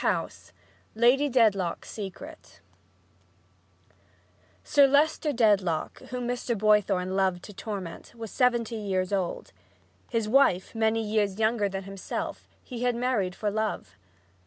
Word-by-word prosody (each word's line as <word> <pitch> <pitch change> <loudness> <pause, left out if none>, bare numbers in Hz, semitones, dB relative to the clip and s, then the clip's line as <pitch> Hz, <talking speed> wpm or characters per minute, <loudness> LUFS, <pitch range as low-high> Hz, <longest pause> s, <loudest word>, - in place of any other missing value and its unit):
II - - +1 0.7
LADY 250 +6 +4
DEDLOCK'S 215 -8 +2
SECRET 230 +10 -9 2.0
Sir 285 -2 +5
Leicester 300 +2 +2
Dedlock, 205 - +1
whom 250 -1 -4
Mr. 245 -1 -2
Boythorn 205 -3 +2
so - - -3
loved 190 -2 0
to 205 - -10
torment, 200 0 -7
was 225 -2 -7
seventy 240 -3 +1
years 190 -2 -2
old. 185 -3 -2 0.6
His 225 -3 -1
wife, 215 -7 +3
many 225 0 +1
years 210 -2 0
younger 220 -2 +1
than 195 0 -5
himself, 195 0 -6 0.2
he 245 -3 -7
had 245 -1 +1
married 235 -7 0
for 210 -1 -2
love. 215 - -3
215 Hz, 125 wpm, -27 LUFS, 195-240 Hz, 2.0 s, Sir